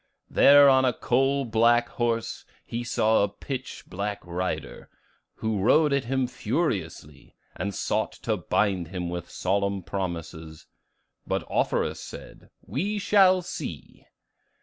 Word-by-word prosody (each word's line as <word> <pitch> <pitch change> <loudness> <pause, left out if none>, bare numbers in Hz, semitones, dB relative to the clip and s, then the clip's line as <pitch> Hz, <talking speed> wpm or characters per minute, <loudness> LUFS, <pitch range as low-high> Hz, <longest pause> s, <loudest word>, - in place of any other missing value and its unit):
There 145 0 +7
on 130 -1 +5
a 125 -1 +2
coal 135 +2 +1
black 120 +1 +3
horse 115 -1 -2 0.2
he 120 +1 -4
saw 110 -2 +2
a 100 - +1
pitch 130 +5 -7
black 100 +2 -4
rider, 90 +2 -4 0.5
who 110 -2 -2
rode 150 +7 +4
at 140 -3 0
him 130 +1 0
furiously, 100 - -3 0.2
and 100 0 -4
sought - - -1
to - - 0
bind 95 -5 0
him 90 0 -4
with 85 -1 -5
solemn 100 0 -1
promises. 85 -4 -6 0.6
But - - -2
Offerus - - 0
said, - - -11 0.2
'We 195 - -2
shall 190 -2 +4
see! - - -8
110 Hz, 125 wpm, -26 LUFS, 95-135 Hz, 0.6 s, There